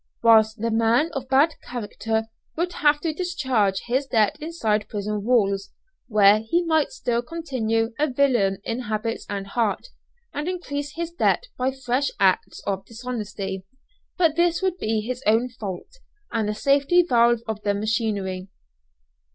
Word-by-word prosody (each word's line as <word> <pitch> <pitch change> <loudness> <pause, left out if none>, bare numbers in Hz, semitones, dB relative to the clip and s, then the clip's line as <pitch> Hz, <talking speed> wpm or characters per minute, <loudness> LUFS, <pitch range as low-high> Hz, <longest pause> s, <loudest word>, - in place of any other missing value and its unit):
Whilst 220 -1 +5
the 230 +1 -1
man 230 +8 +2
of 265 -1 -5
bad 285 +5 +4
character 225 -1 -3 0.3
would 350 +2 -1
have 295 -2 +3
to 325 -2 -1
discharge 260 - 0
his 260 +3 0
debt 220 -5 +2
inside 225 -11 -1
prison 210 0 -3
walls, 200 -4 +2 0.4
where 210 -2 +5
he 225 +11 0
might 315 -2 +2
still 240 - -1
continue 245 -7 -1
a 300 - +3
villain 245 -8 +2
in 230 +2 -3
habits 225 -1 -3
and 200 -1 -3
heart, 220 - -1 0.4
and 295 +3 -3
increase 290 -6 -4
his 340 0 -3
debt - - +1
by 255 +1 0
fresh 265 +1 -1
acts 190 -2 +1
of 195 -1 -2
dishonesty; 215 -5 -5 0.5
but 330 -4 +3
this 345 0 +2
would 370 -1 0
be 220 0 0
his 250 +3 -4
own 225 +4 +3
fault, 220 - -8 0.3
and 220 -3 0
the 210 - -2
safety 280 +8 +3
valve 235 -2 +4
of 220 -1 -3
the 205 -1 0
machinery. 200 -3 -1
235 Hz, 150 wpm, -24 LUFS, 210-285 Hz, 0.5 s, Whilst